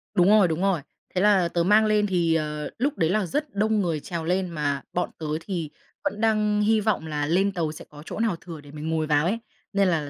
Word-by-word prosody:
Đúng 180 0 +5
rồi, 210 -4 +6
đúng 165 +2 -2
rồi. 195 -6 +2 0.3
Thế 185 - +2
là 200 -4 +4
tớ 170 0 0
mang 210 +4 +5
lên 210 -1 +2
thì, 170 -3 +2
ờ, 150 -1 -2
lúc 280 +4 -1
đấy 160 - +2
là 210 +1 +1
rất 290 - -3
đông 215 0 +2
người 165 -4 -1
trèo 170 +2 -5
lên 180 +2 0
mà 145 -4 -1
bọn 180 - 0
tớ 160 - -5 0.2
thì 170 -6 -4 0.3
vẫn 225 -7 -2
đang 210 -1 +2
hy 215 0 +3
vọng 200 -7 0
là 150 -1 -1
lên 190 +5 +2
tàu 165 -5 -2
sẽ 155 - -10
có 150 0 -12
chỗ - - -6
nào 220 -6 +1
thừa 165 -5 -9
để 145 -1 -14
mình 150 +1 -5
ngồi 160 -1 0
vào 150 0 +3
ấy, 210 +6 0 0.3
nên 200 -1 +3
là 155 -5 0
180 Hz, 250 wpm, -25 LUFS, 160-210 Hz, 0.3 s, rồi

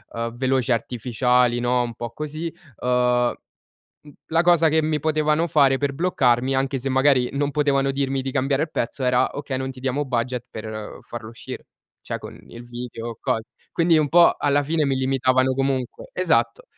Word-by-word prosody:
ehm, 115 0 -3
veloci 130 0 0
artificiali, 125 +1 +1
no, 125 0 +1
un 120 -1 -5
po' 120 +1 -6
così, 155 +5 -5 0.3
ehm, 125 -1 +2 0.7
m 150 - -15 0.2
la 165 +1 +2
cosa 170 -2 +5
che 160 +1 +3
mi 155 -1 0
potevano 155 +1 +1
fare 140 -4 +4
per 140 0 -1
bloccarmi, 135 -6 +1
anche 135 +1 0
se 130 - -4
magari 130 -1 +3
non 145 +1 0
potevano 140 -2 +1
dirmi 135 -1 -1
di 135 0 -4
cambiare 135 +1 +1
il 155 - -6
pezzo 125 +3 -3
era: 125 0 +3
"Okay 140 -2 -3
non 130 0 -3
ti 130 - -12
diamo 135 +2 -1
budget 125 -1 -2
per 110 -1 -7
farlo 120 -2 -8
uscire", 115 - -8 0.4
cioè - - -4
con - - -10
il 120 - -11
video 120 -1 -7
o 115 - -8
cos 125 -4 -1 0.3
quindi 165 -1 +3
un 155 -1 +2
po' 170 +4 +6
alla 145 0 +2
fine 155 +1 0
mi 135 - +1
limitavano 130 0 +2
comunque. 135 -2 -2
Esatto, 120 -10 +1
130 Hz, 180 wpm, -23 LUFS, 125-145 Hz, 0.7 s, po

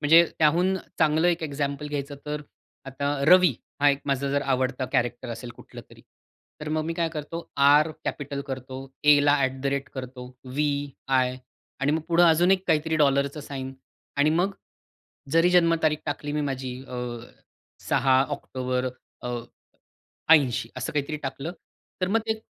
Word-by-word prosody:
म्हणजे 165 +3 +7
त्याहून 175 +5 +3 0.2
चांगलं 160 +2 +3
एक 170 -1 0
एक्झॅम्पल 140 -1 -3
घ्यायचं 145 -1 -4
तर, 150 0 -3 0.4
आता 140 +2 -2
रवी 180 -5 +7 0.3
हा 145 - +6
एक 140 - -1
माझा 140 0 0
जर 140 0 +1
आवडता 130 -1 0
कॅरेक्टर 120 -1 0
असेल 120 +1 -6
कुठलं - - -11
तरी. - - -16 0.6
तर 150 - -5
मग 155 0 -1
मी 165 - -3
काय 165 0 0
करतो 160 +2 -5 0.2
आर 145 +3 +5
कॅपिटल 140 -1 -4
करतो, 130 -1 -6 0.3
एला 145 -1 +6
ॲट 135 -1 -1
द 140 - -2
रेट 140 0 -4
करतो, 130 -1 -7 0.3
वी-आय 140 -3 0 0.4
आणि 140 +2 +2
मग 160 - +1
पुढे 170 +1 +4
अजून 175 +2 +5
एक 190 -1 +2
काहीतरी 160 +1 +1
डॉलरच 140 0 +2
साइन 135 -1 -5 0.4
आणि 145 +2 +4
मग 180 +5 +1 0.8
जरी 165 +2 +5
जन्म 170 -2 +5
तारीख 155 -1 +2
टाकली 145 0 -3
मी 150 - 0
माझी 130 -3 -3
अ, 125 - -6 0.9
6 130 0 +4
ऑक्टोबर, 130 -2 -2 0.3
अ, 125 - -4 1.1
80 130 -6 +2
असं - - -4
काहीतरी 150 +1 -1
टाकलं, 135 +5 -4 0.5
तर 185 - +1
मग 225 +3 +2
ते 220 0 -1
145 Hz, 155 wpm, -26 LUFS, 135-160 Hz, 1.1 s, म्हणजे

